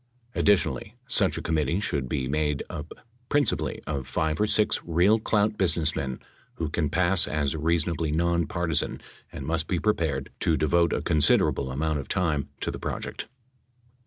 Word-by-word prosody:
Addi 105 - +5
tionally, 100 +2 -4
such 105 -6 +2
a - - -5
committee 80 +2 0
should 70 - -2
be 65 -3 -1
made 75 0 0
up 75 +2 -7 0.4
principally 80 - +1
of 70 -4 -3
five 80 +4 -1
or 105 - +3
six 105 0 +2
real 90 +6 +3
clout 105 -1 +1
businessmen 80 -7 0 0.4
who 80 -2 -3
can 75 -1 -1
pass 85 +3 +3
as 75 -1 -1
reason 85 +2 +1
ably 80 -2 -2
non 85 0 +1
partisan 85 -1 -1 0.3
and - - -7
must 80 -1 -1
be 90 - 0
prepared 80 -10 0
to 80 - +2
devote 85 +2 +2
a - - -1
considera 75 -4 +4
able 65 -1 -4
amount 75 +3 -1
of 70 - -6
time 80 -7 0
to - - -1
the - - -7
project. - - -4
80 Hz, 170 wpm, -26 LUFS, 75-85 Hz, 0.4 s, Addi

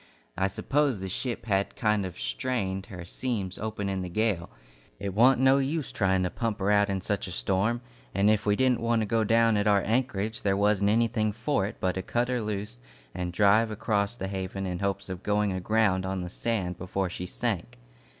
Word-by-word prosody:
I 95 +1 +1
suppose 135 +4 0
the 95 - -4
ship 120 +6 -4
had 100 -3 0
kind 105 -4 +1
of 90 - -10
strained 95 - -2
her 90 -3 -8
seams 100 -2 -3
open 110 -2 -3
in 95 -1 -2
the 90 - -4
gale. 100 -3 0 0.5
It 100 -1 -3
want 120 +5 +5
no 135 +1 +5
use 145 +1 -1
trying 95 -2 +1
to 90 - -1
pump 115 -3 -2
her 100 +1 +1
out 105 0 +4
in 95 -1 -1
such - - -2
a - - -6
storm, 100 - 0 0.3
and 100 +2 +2
if 105 -1 +3
we 105 -1 +2
didn't 130 +1 +2
want 115 -1 +1
to - - -1
go 110 +2 +1
down 115 0 +4
at 105 0 +1
our 100 -2 +4
anchorage, 110 -2 -1
there 100 -1 +1
wasn't 100 0 +3
anything 110 -1 +2
for 115 -1 0
it - - -7
but 95 - +1
to 95 - -3
cut 120 +5 -1
her 125 -2 0
loose 105 - -4 0.3
and 90 -1 -3
drive 105 +4 +4
across 105 0 -1
the 95 - -3
Haven 95 0 -4
in 90 -2 -3
hopes 100 0 -2
of 95 -1 -6
going 105 -1 +1
aground 95 0 +1
on 95 0 -2
the 90 -1 -6
sand 95 -7 -2
before 95 +1 -2
she 90 +1 -5
sank. 100 - -3
100 Hz, 210 wpm, -28 LUFS, 95-115 Hz, 0.5 s, want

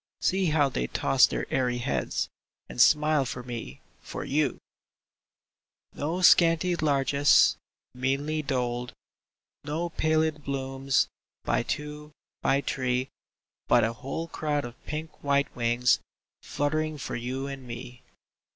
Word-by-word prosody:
See 190 0 +1
how 150 -2 +3
they 60 - -2
toss - - +4
their - - -3
airy 125 -2 +1
heads, 70 - -1 0.4
And - - -1
smile 150 +2 +5
for 125 -1 -5
me, 115 - -7 0.2
for - - -6
you! 145 -1 +1 1.4
No 165 +6 -2
scanty 170 +1 +5
largess, 140 -2 +4 0.4
meanly 140 +5 -1
doled 125 -3 -2 0.4
— - - -66 0.3
No 160 +4 -3
pallid 155 -1 +1
blooms, 135 -1 0 0.4
by - - +1
two, 150 0 -5 0.3
by 135 +1 +2
three, 130 -1 -1 0.6
But - - +5
a 115 +1 0
whole 135 +8 -5
crowd 150 -4 -2
of 120 0 -11
pink 155 +1 -6
white 140 0 +1
wings 120 +1 +2 0.4
Fluttering 155 +1 -1
for 140 - -5
you 130 +3 -3
and 135 -2 -7
me. 120 +1 -8
140 Hz, 125 wpm, -27 LUFS, 125-155 Hz, 1.4 s, smile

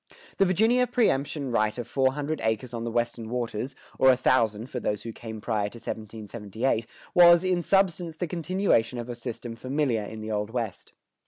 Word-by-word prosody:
The 195 - +5
Virginia 225 +7 +3
preëmption 145 - 0
right 110 0 +1
of 120 -2 -4
four 130 +1 +2
hundred 150 +2 -3
acres 110 +2 -1
on 115 0 -3
the - - -2
Western 120 -1 -1
waters, 120 +1 -3 0.2
or 130 - +6
a 130 - +7
thousand 115 -3 +2
for 125 - -3
those 105 -2 -2
who 115 - -5
came 110 -1 -8
prior 105 -2 -1
to - - -15
1778, 110 +1 -3 0.3
was, 175 0 +8
in 185 -1 +1
substance, 175 -3 +1
the 175 - -2
continuation 170 - +1
of 120 +1 -5
a - - -5
system 120 -1 -6
familiar 130 -2 0
in 110 +2 -7
the 110 0 -5
Old 105 0 -1
West. 115 -4 -4
120 Hz, 185 wpm, -27 LUFS, 110-155 Hz, 0.3 s, was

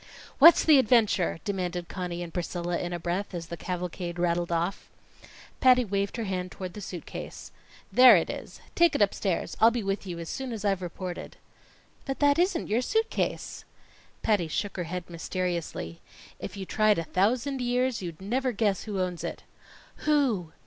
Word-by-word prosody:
"What's 330 +4 +9
the 305 -4 +7
adventure?" 220 -8 +3
demanded 180 -4 -2
Conny 175 -2 -4
and 170 - -9
Priscilla 175 0 -2
in 175 - -3
a 175 - -2
breath, 180 +3 -3
as 170 -1 -4
the 170 - -6
cavalcade 175 0 -4
rattled 175 0 0
off. 170 +4 -2 0.7
Patty 255 -1 +5
waved 200 +2 -2
her 230 - -2
hand 185 -3 -3
toward 185 -2 -7
the 210 - -8
suit 180 -3 -7
case. - - -8 0.4
"There 250 -3 +9
it 170 - +2
is. - - -8
Take 340 -2 +4
it - - 0
upstairs. 195 -2 -1
I'll 225 - +7
be 235 -1 -2
with 195 0 -2
you 175 -2 -5
as 170 -1 -6
soon 260 +4 -4
as 210 -2 -5
I've 195 -2 +1
reported." 180 0 -6 0.7
"But 270 -1 -3
that 285 +1 +3
isn't 360 -1 +1
your 225 +4 +1
suit 445 - 0
case." - - -3 0.6
Patty 205 -6 +2
shook 200 +6 -3
her 175 - -2
head 180 +1 -5
mysteriously. 170 - -4 0.4
"If - - -7
you 195 - -5
tried 215 +1 +3
a 165 - -1
thousand 245 - 0
years 245 -1 0
you'd 170 -4 -6
never 250 +7 -1
guess 205 -3 0
who 205 -3 -3
owns 180 -2 -2
it." - - -5 0.6
"Who?" 250 - +2
195 Hz, 180 wpm, -28 LUFS, 175-240 Hz, 0.7 s, What's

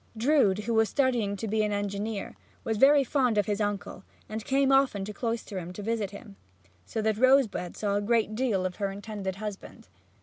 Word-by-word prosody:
Drood, 220 -6 +3
who 235 - -1
was 220 -1 +3
studying 240 -7 +1
to 220 +3 -5
be 215 +1 +1
an 210 0 0
engineer, 205 +1 -3 0.3
was 225 -1 -1
very 275 +4 +6
fond 255 -4 +1
of 205 - +3
his 210 0 -1
uncle 205 -2 -3 0.2
and 220 0 -5
came 270 +3 +2
often 270 -8 +3
to 210 - -6
Cloisterham 205 -7 -4
to 205 - -7
visit 220 -2 -1
him, 200 0 -12 0.5
so 220 - -3
that 220 -1 0
Rosebud 255 -9 +3
saw 200 -1 0
a - - 0
great 220 0 +1
deal 215 -6 0
of 180 -1 -4
her 200 -2 -1
intended 200 -1 -5
husband. 210 -1 -8
215 Hz, 195 wpm, -28 LUFS, 200-235 Hz, 0.5 s, very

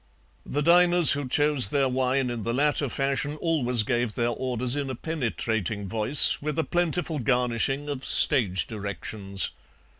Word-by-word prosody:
The 145 +2 -3
diners 175 0 +5
who 140 -2 -1
chose 145 -4 +2
their 140 +1 0
wine 130 0 -1
in 120 -2 -6
the 115 +3 -4
latter 145 0 0
fashion 140 +3 -3
always 130 -8 0
gave 120 -2 -3
their 120 -1 -1
orders 125 +1 -2
in 140 -2 -4
a 130 - -5
penetrating 110 - -4
voice, 115 +7 +4
with 150 +1 -5
a 160 - 0
plentiful 175 -2 -2
garnishing 125 +3 -1
of 140 -2 -6
stage 95 -7 +4
directions. 100 -2 -5
130 Hz, 150 wpm, -24 LUFS, 115-145 Hz, -, diners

